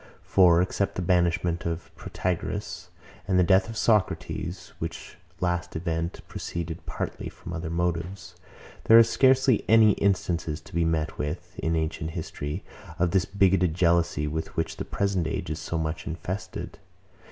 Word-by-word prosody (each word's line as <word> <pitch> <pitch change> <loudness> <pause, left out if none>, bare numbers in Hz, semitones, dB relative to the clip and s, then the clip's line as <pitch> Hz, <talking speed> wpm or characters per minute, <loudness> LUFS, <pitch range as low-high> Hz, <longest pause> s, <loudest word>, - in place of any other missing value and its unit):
For, 90 -2 +5
except 100 +1 -1
the 90 - -2
banishment 85 -1 +1
of 85 0 -4
Protagoras, 90 +1 -4 0.4
and 95 -2 +2
the 90 - +5
death 95 +5 +4
of 115 - -6
Socrates, 90 -5 0
which 80 +2 -6 0.2
last 90 0 -1
event 85 0 -2
proceeded 85 -1 -5
partly - - -4
from 85 - -9
other 80 0 -4
motives, 85 +2 -2 0.5
there 115 - +8
are 115 - +10
scarcely 130 0 +4
any 110 -1 +7
instances 85 -6 0
to - - -16
be 85 0 +2
met 80 -2 -1
with, 75 +4 -4
in 80 +1 0
ancient 80 0 -2
history, 75 -2 -4 0.3
of 90 -1 +1
this 95 -1 +2
bigotted 95 -4 +2
jealousy, 85 -4 +2
with 80 +2 -4
which - - -1
the - - -4
present 95 -5 0
age - - -3
is 80 - -3
so 80 +1 -3
much 80 0 -3
infested. 90 +3 -5
85 Hz, 150 wpm, -26 LUFS, 80-95 Hz, 0.5 s, are